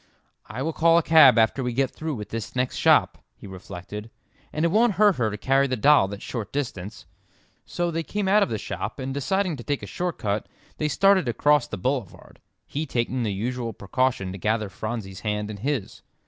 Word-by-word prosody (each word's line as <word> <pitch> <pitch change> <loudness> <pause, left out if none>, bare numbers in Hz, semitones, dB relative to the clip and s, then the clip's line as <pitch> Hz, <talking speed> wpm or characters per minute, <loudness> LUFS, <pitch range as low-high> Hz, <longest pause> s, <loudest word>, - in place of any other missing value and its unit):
"I 130 - -5
will 160 +2 -2
call 165 +1 +4
a 170 - +3
cab 155 -6 +7
after 115 +4 +3
we 125 -1 -2
get 135 +1 0
through 155 -2 -4
with 105 -3 -7
this 115 +1 -6
next 125 0 -1
shop," - - +3 0.2
he - - -14
reflected, 95 +3 -8 0.4
"and 155 +2 -1
it - - +3
won't 225 +2 +3
hurt 205 -1 +4
her 115 -3 +1
to 105 - -5
carry 135 +5 +2
the 130 - -1
doll 140 -4 +5
that 100 +1 -8
short 115 -5 -5
distance." 110 -8 -5 0.6
So 175 -1 -2
they 165 0 -2
came 200 +5 -3
out 205 +2 +4
of - - +2
the 110 - -2
shop, 100 -2 -5
and 135 -1 -4
deciding 180 +4 -1
to 120 - -9
take 145 +2 -2
a - - -3
short 180 -1 -3
cut, 105 0 -2 0.3
they 150 - 0
started 190 0 +3
across 145 +4 +2
the - - -6
boulevard, 120 -2 -4 0.3
he 155 +2 -4
taking 125 0 -1
the 110 -3 -1
usual 115 +3 -3
precaution 120 0 -1
to 95 - -8
gather 110 +1 0
Phronsie's 105 -2 -5
hand 105 0 -3
in 105 - -7
his. 130 -1 -3
125 Hz, 210 wpm, -24 LUFS, 105-150 Hz, 0.6 s, cab